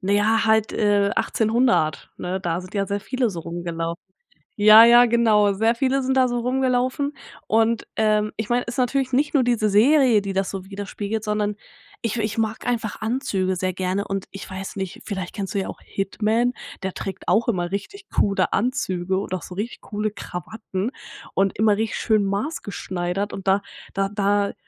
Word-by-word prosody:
naja 205 Hz, +3 st, +2 dB
halt, 220 Hz, 0 st, +3 dB
äh, 205 Hz, -1 st, +2 dB
1800, 225 Hz, -8 st, +1 dB
ne? 185 Hz, +1 st, -3 dB
Da 170 Hz, -1 st, -1 dB
sind 185 Hz, +2 st, -12 dB
ja 200 Hz, -1 st, 0 dB
sehr 200 Hz, +1 st, -1 dB
viele 250 Hz, +1 st, -1 dB
so 170 Hz, -3 st, -6 dB
rumgelaufen. 170 Hz, 0 st, -4 dB, 0.5 s
Ja, 215 Hz, +2 st, +9 dB
ja 240 Hz, +1 st, +8 dB
genau, 220 Hz, -3 st, +4 dB
sehr 225 Hz, +4 st, +2 dB
viele 265 Hz, +3 st, +1 dB
sind 265 Hz, +1 st, 0 dB
da 260 Hz, -1 st, +4 dB
so 245 Hz, -, -2 dB
rumgelaufen 255 Hz, +3 st, 0 dB, 0.3 s
und, 225 Hz, +1 st, +2 dB
ähm 215 Hz, -1 st, +2 dB
ich 220 Hz, -1 st, -4 dB
meine, 245 Hz, +1 st, +2 dB
ist 235 Hz, +2 st, -6 dB
natürlich 260 Hz, +1 st, +1 dB
nicht 285 Hz, +4 st, +1 dB
nur 285 Hz, -, +4 dB
diese 235 Hz, -3 st, +2 dB
Serie, 235 Hz, +2 st, +5 dB
die 195 Hz, 0 st, -4 dB
das 195 Hz, 0 st, -1 dB
so 195 Hz, -2 st, -5 dB
widerspiegelt, 205 Hz, +2 st, -4 dB
sondern 210 Hz, -1 st, -1 dB, 0.5 s
ich 230 Hz, 0 st, -1 dB
we -, -, 0 dB
ich 215 Hz, 0 st, -2 dB
mag 220 Hz, -1 st, -1 dB
einfach 230 Hz, -3 st, -2 dB
Anzüge 215 Hz, -5 st, -1 dB
sehr 185 Hz, 0 st, -1 dB
gerne 185 Hz, +2 st, -1 dB
und 195 Hz, -1 st, -3 dB
ich 195 Hz, -, -8 dB
weiß 190 Hz, +1 st, -6 dB
nicht, 190 Hz, -2 st, -5 dB
vielleicht 190 Hz, -4 st, -4 dB
kennst 200 Hz, -2 st, -5 dB
du 200 Hz, -, +2 dB
ja 190 Hz, -, -3 dB
auch -, -, -8 dB
Hitman, 220 Hz, +5 st, 0 dB, 0.3 s
der 190 Hz, -1 st, -2 dB
trägt 195 Hz, -, -6 dB
auch 225 Hz, +2 st, +3 dB
immer 175 Hz, -6 st, -1 dB
richtig 395 Hz, -, -5 dB
coole 195 Hz, -3 st, +1 dB
Anzüge 190 Hz, -7 st, 0 dB
und 195 Hz, -, -5 dB
auch 185 Hz, -, -2 dB
so 180 Hz, -, -9 dB
richtig 215 Hz, +5 st, -5 dB
coole 210 Hz, 0 st, -3 dB
Krawatten 200 Hz, +2 st, -5 dB, 0.4 s
und 195 Hz, 0 st, +1 dB
immer 215 Hz, -1 st, +4 dB
richtig 220 Hz, +1 st, -2 dB
schön 215 Hz, -3 st, +2 dB
maßgeschneidert 200 Hz, -, -3 dB
und 195 Hz, -, -7 dB
da 195 Hz, +1 st, +4 dB, 0.3 s
da 195 Hz, 0 st, +1 dB
da 200 Hz, 0 st, +1 dB
210 Hz, 185 wpm, -23 LUFS, 195-235 Hz, 0.5 s, Ja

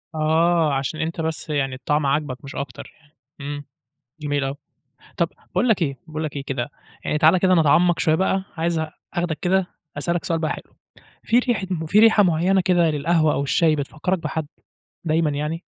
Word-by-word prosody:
آه، 160 Hz, 0 st, +2 dB
عشان 135 Hz, +4 st, -2 dB
أنت 165 Hz, +1 st, -2 dB
بس 160 Hz, 0 st, -4 dB
يعني 135 Hz, -3 st, -1 dB
الطعم 145 Hz, +3 st, 0 dB
عاجبك، 140 Hz, -1 st, -1 dB
مش 140 Hz, -, -9 dB
أكتر 135 Hz, -3 st, -6 dB
يعني، 150 Hz, -1 st, -28 dB, 0.3 s
إمم، 145 Hz, 0 st, -5 dB, 0.6 s
جميل 145 Hz, -2 st, -1 dB
أوي. 135 Hz, +1 st, -3 dB, 0.6 s
طب 170 Hz, -1 st, +1 dB, 0.2 s
باقول 245 Hz, -, 0 dB
لك 200 Hz, -5 st, +3 dB
إيه 140 Hz, -4 st, -1 dB
باقول 155 Hz, 0 st, -4 dB
لك 150 Hz, -2 st, -4 dB
إيه 140 Hz, -, -4 dB
كده، 135 Hz, -1 st, -3 dB, 0.4 s
يعني 150 Hz, -, 0 dB
تعال 160 Hz, +4 st, +5 dB
كده 185 Hz, +1 st, +3 dB
نتعمق 165 Hz, +2 st, +4 dB
شوية 155 Hz, -, +3 dB
بقى، 190 Hz, +2 st, +1 dB
عايز 165 Hz, 0 st, 0 dB, 0.3 s
أخدك 175 Hz, -3 st, -2 dB
كده 190 Hz, 0 st, +2 dB, 0.3 s
أسألك 170 Hz, +4 st, -1 dB
سؤال 165 Hz, -1 st, 0 dB
بقى 160 Hz, -1 st, -1 dB
حلو، -, -, -8 dB, 0.5 s
في 235 Hz, -, +3 dB
ريحة 240 Hz, -6 st, 0 dB, 0.2 s
في 200 Hz, +6 st, +3 dB
ريحة 220 Hz, -1 st, +6 dB
معينة 180 Hz, +2 st, +3 dB
كده 175 Hz, -3 st, +3 dB
للقهوة 155 Hz, +1 st, +2 dB
أو 140 Hz, -, 0 dB
الشاي 155 Hz, +2 st, +2 dB
بتفكرك 155 Hz, +5 st, -2 dB
بحد 160 Hz, -1 st, -3 dB, 0.6 s
دايمًا 160 Hz, -1 st, +2 dB
يعني؟ 150 Hz, +4 st, -3 dB
160 Hz, 180 wpm, -22 LUFS, 145-175 Hz, 0.6 s, ريحة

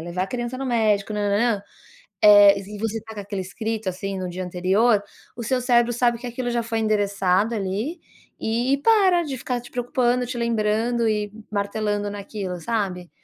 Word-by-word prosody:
levar 175 Hz, +2 st, -3 dB
a -, -, -2 dB
criança 240 Hz, +3 st, -4 dB
no 270 Hz, -, -4 dB
médico, 215 Hz, -4 st, +1 dB
nã, 205 Hz, -1 st, -1 dB
nã, 200 Hz, +1 st, +2 dB
nã". 200 Hz, -, -4 dB, 0.6 s
Eh, 205 Hz, -1 st, +8 dB
e 205 Hz, +2 st, -9 dB
você 225 Hz, +1 st, -3 dB
tá 220 Hz, +1 st, -11 dB
com 205 Hz, -, -5 dB
aquilo 200 Hz, -1 st, -4 dB
escrito, 220 Hz, +2 st, -3 dB
assim, 195 Hz, +1 st, -4 dB
no 185 Hz, -1 st, -4 dB
dia 180 Hz, +1 st, -5 dB
anterior. 190 Hz, +5 st, +2 dB, 0.3 s
O 235 Hz, -, -6 dB
seu 255 Hz, +3 st, 0 dB
cérebro 240 Hz, -1 st, +3 dB
sabe 240 Hz, -1 st, +1 dB
que 245 Hz, -, -6 dB
aquilo 245 Hz, +1 st, -3 dB
já 240 Hz, 0 st, 0 dB
foi 225 Hz, 0 st, -3 dB
endereçado, 205 Hz, -1 st, +1 dB
ali, 215 Hz, -, -3 dB, 0.4 s
e 240 Hz, +5 st, +1 dB
para, 385 Hz, -6 st, +4 dB
de 280 Hz, -4 st, -4 dB
ficar 250 Hz, -1 st, -3 dB
te 240 Hz, -, -14 dB
preocupando, 245 Hz, 0 st, 0 dB
te 250 Hz, -, -5 dB
lembrando 230 Hz, 0 st, +1 dB
e 210 Hz, -1 st, -1 dB, 0.2 s
martelando 205 Hz, 0 st, -1 dB
naquilo 200 Hz, -3 st, -5 dB
sabe. 185 Hz, -3 st, -2 dB
215 Hz, 185 wpm, -23 LUFS, 200-240 Hz, 0.6 s, Eh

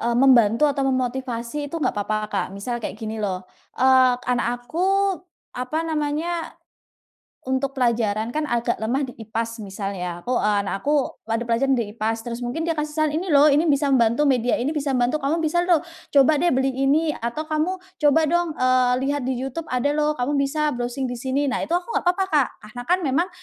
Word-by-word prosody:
eee, 235 Hz, +1 st, 0 dB
membantu 245 Hz, -1 st, +5 dB
atau 285 Hz, -1 st, +1 dB
memotivasi 255 Hz, +1 st, -2 dB
itu 330 Hz, -, -5 dB
nggak 310 Hz, -, 0 dB
papa 210 Hz, +1 st, -2 dB, 0.2 s
Kak 200 Hz, -, 0 dB
misal 240 Hz, +4 st, -4 dB
kayak 210 Hz, -, -5 dB
gini 220 Hz, -1 st, -5 dB
loh, 185 Hz, -3 st, -2 dB, 0.3 s
eee, 260 Hz, -1 st, +5 dB
anak 245 Hz, 0 st, -1 dB
aku, 385 Hz, +6 st, +1 dB, 0.3 s
apa 255 Hz, +5 st, -3 dB
namanya. 320 Hz, +2 st, -2 dB, 0.9 s
Untuk 265 Hz, +1 st, -2 dB
pelajaran 230 Hz, -2 st, 0 dB
kan 305 Hz, -1 st, -2 dB
agak 235 Hz, 0 st, +1 dB
lemah 260 Hz, +5 st, 0 dB
di 250 Hz, -, -10 dB
IPAS 225 Hz, +1 st, -4 dB
misal 200 Hz, 0 st, -5 dB
ya 180 Hz, -2 st, -4 dB
aku 250 Hz, -, -1 dB
eee, 210 Hz, -3 st, +2 dB
anak 195 Hz, 0 st, -3 dB
aku 290 Hz, -1 st, +1 dB, 0.2 s
ada 230 Hz, +1 st, -1 dB
pelajaran 255 Hz, +3 st, +2 dB
di 210 Hz, -3 st, -3 dB
IPAS 225 Hz, 0 st, -2 dB
terus 240 Hz, 0 st, -5 dB
mungkin 260 Hz, +7 st, -3 dB
dia 330 Hz, -, +1 dB
kasih 300 Hz, -1 st, -3 dB
saran, 310 Hz, -1 st, +1 dB
"Ini 345 Hz, +4 st, -2 dB
loh 290 Hz, 0 st, +6 dB
ini 310 Hz, +3 st, +3 dB
bisa 285 Hz, 0 st, +2 dB
membantu 235 Hz, +4 st, +3 dB
media 250 Hz, -3 st, +2 dB
ini 275 Hz, +6 st, -1 dB
bisa 280 Hz, -3 st, -1 dB
membantu," 250 Hz, +5 st, +1 dB
"Kamu 290 Hz, +4 st, 0 dB
bisa 345 Hz, +3 st, +1 dB
loh 350 Hz, -2 st, +4 dB, 0.3 s
coba 285 Hz, +1 st, +4 dB
deh 350 Hz, -, +3 dB
beli 265 Hz, 0 st, +1 dB
ini," 290 Hz, +4 st, +2 dB
atau 235 Hz, +7 st, -4 dB
"Kamu 370 Hz, +4 st, -3 dB
coba 295 Hz, +2 st, +5 dB
dong," 345 Hz, +2 st, +1 dB
eee, 255 Hz, -1 st, +3 dB
"lihat 280 Hz, -2 st, -1 dB
di 255 Hz, -, -1 dB
YouTube 270 Hz, +5 st, -5 dB
ada 250 Hz, +1 st, -1 dB
loh 300 Hz, -1 st, 0 dB
kamu 250 Hz, +4 st, -1 dB
bisa 300 Hz, +1 st, 0 dB
browsing 245 Hz, +2 st, -3 dB
di 245 Hz, -, -3 dB
sini," 260 Hz, +4 st, -1 dB
nah 260 Hz, -3 st, -1 dB
itu -, -, -4 dB
aku 360 Hz, -, -7 dB
nggak -, -, +1 dB
apa-apa 380 Hz, +2 st, +1 dB
Kak 280 Hz, -5 st, +3 dB, 0.2 s
karena 245 Hz, +3 st, -8 dB
kan 365 Hz, +1 st, +4 dB
memang, 340 Hz, +6 st, +2 dB
265 Hz, 200 wpm, -23 LUFS, 235-300 Hz, 0.9 s, loh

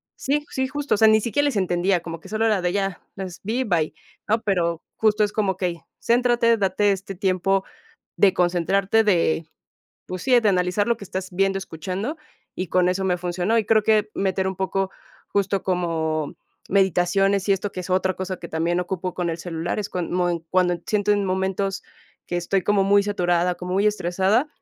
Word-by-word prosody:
Sí, 290 Hz, +2 st, -1 dB
sí, 265 Hz, 0 st, -1 dB
justo, 290 Hz, +2 st, -2 dB
o -, -, -3 dB
sea, 220 Hz, +1 st, +6 dB
ni 220 Hz, 0 st, +5 dB
siquiera 285 Hz, +6 st, 0 dB
les 275 Hz, -7 st, 0 dB
entendía, 180 Hz, 0 st, +1 dB
como 165 Hz, 0 st, -7 dB
que -, -, -13 dB
solo 220 Hz, +1 st, 0 dB
era 210 Hz, -4 st, +2 dB
de 175 Hz, 0 st, 0 dB
ya, 195 Hz, -3 st, -2 dB
las 185 Hz, -3 st, -7 dB
vi, 230 Hz, +6 st, -1 dB
bye, 165 Hz, -7 st, 0 dB, 0.4 s
¿no? 220 Hz, +2 st, +3 dB
Pero 170 Hz, -5 st, 0 dB, 0.2 s
justo 215 Hz, -1 st, +3 dB
es 205 Hz, -, -5 dB
como 195 Hz, -4 st, 0 dB
que 180 Hz, -2 st, 0 dB
y 170 Hz, -, -11 dB, 0.2 s
céntrate, 240 Hz, -1 st, +3 dB
date 200 Hz, 0 st, +2 dB
este 195 Hz, 0 st, -4 dB
tiempo 190 Hz, 0 st, +1 dB, 0.5 s
de 195 Hz, -2 st, +4 dB
concentrarte, 190 Hz, +4 st, +2 dB
de, 170 Hz, -5 st, +2 dB, 0.6 s
pues 185 Hz, -1 st, -5 dB
sí, 255 Hz, -2 st, +5 dB
de 225 Hz, -, 0 dB
analizar 180 Hz, +2 st, +1 dB
lo 235 Hz, -, +2 dB
que 205 Hz, -, -9 dB
estás 190 Hz, 0 st, -5 dB
viendo, 195 Hz, +1 st, +1 dB
escuchando, 190 Hz, -, -5 dB, 0.4 s
y 185 Hz, -, -3 dB
con 180 Hz, +1 st, +2 dB
eso 190 Hz, +1 st, -1 dB
me 180 Hz, -1 st, +1 dB
funcionó. 180 Hz, +5 st, 0 dB
Y 215 Hz, -, -2 dB
creo 215 Hz, 0 st, +3 dB
que 215 Hz, -1 st, +3 dB
meter 190 Hz, -1 st, 0 dB
un 190 Hz, -, -3 dB
poco 190 Hz, +1 st, -1 dB, 0.4 s
justo 200 Hz, -1 st, 0 dB
como 160 Hz, -4 st, -1 dB, 0.3 s
meditaciones 195 Hz, +1 st, +2 dB
y 200 Hz, -, +5 dB
esto, 195 Hz, +1 st, -3 dB
que -, -, -6 dB
es 180 Hz, -, -9 dB
otra 185 Hz, 0 st, +1 dB
cosa 185 Hz, -1 st, -4 dB
que -, -, -8 dB
también 170 Hz, +2 st, 0 dB
ocupo 180 Hz, 0 st, -4 dB
con 175 Hz, -2 st, -2 dB
el 165 Hz, -, -3 dB
celular, 170 Hz, +2 st, -3 dB
es 205 Hz, -, -3 dB
cuan 180 Hz, -2 st, -3 dB
moe 175 Hz, -2 st, 0 dB
cuando 180 Hz, -1 st, +2 dB
siento 210 Hz, -1 st, +1 dB
en 205 Hz, -1 st, +2 dB
momentos 190 Hz, +1 st, -1 dB, 0.4 s
que 175 Hz, -, -4 dB
estoy 185 Hz, +2 st, 0 dB
como 205 Hz, -1 st, +3 dB
muy 200 Hz, +1 st, +4 dB
saturada, 180 Hz, -3 st, +1 dB
como 180 Hz, +1 st, -5 dB
muy 200 Hz, +2 st, +2 dB
estresada, 195 Hz, -, +1 dB
190 Hz, 200 wpm, -23 LUFS, 180-205 Hz, 0.6 s, sea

